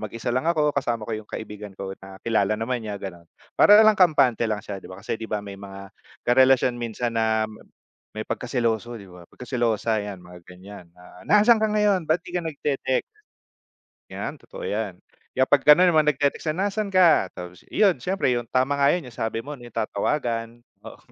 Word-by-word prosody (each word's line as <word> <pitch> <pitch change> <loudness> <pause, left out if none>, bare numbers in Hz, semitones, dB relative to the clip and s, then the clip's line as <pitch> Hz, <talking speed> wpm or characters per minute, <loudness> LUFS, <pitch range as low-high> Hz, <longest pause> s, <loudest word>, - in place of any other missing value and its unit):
mag-isa 115 +3 -4
lang 130 - +1
ako 150 -3 +1
kasama 120 -5 -2
ko 115 - -3
yung - - -25
kaibigan 105 -1 -7
ko 95 0 -5
na 95 0 -11
kilala 110 -1 +1
naman 120 +1 -2
niya 105 -2 -5
gano'n. 85 -3 -8 0.3
Para 210 +1 +7
lang 215 - +6
kampante 140 -10 +3
lang 105 - -1
siya 100 -2 -8
di - - -12
ba, 95 - -10
kasi - - -3
di 110 0 -8
ba 105 - 0
may 100 -1 -9
mga 100 0 -10 0.4
karelasyon 130 0 +4
minsan 120 0 -4
na, 110 -1 +1
ma 110 - -13 0.5
may 110 - -4
pagkaseloso 120 -1 -2
di 100 -4 -11
ba, 90 -1 -14
pagkaselosa 115 -3 -1
'yan 100 -3 -6
mga 90 0 -13
ganiyan 90 +1 -12
na, 90 0 -16
"Nasaan 215 +2 +5
ka 220 - +2
ngayon 210 -5 +1
ba't 165 +2 +1
di - - -11
ka 180 - -1
nagte-text?" 145 -4 -1 1.1
'Yan - - -6
totoo - - -11
'yan, 465 - -3 0.4
kaya 130 - +3
pag 140 0 +3
gano'n 175 +4 +7
naman 155 -2 +3
nag-te-text 145 +2 0
na, 195 +2 0
"Nasaan 215 +1 -2
ka?" 180 - +4
Tapos 90 -1 -9
iyon 195 -9 +2
siyempre 180 -2 0
yung 120 -1 -2
tama 130 +4 0
nga 140 - +4
'yon 180 - -4
yung 120 - -12
sabi 115 0 -2
mo 145 - -8
yung 120 - -11
tatawagan, 115 +1 -2 0.2
oo, - - -11
120 Hz, 195 wpm, -24 LUFS, 105-150 Hz, 1.1 s, Para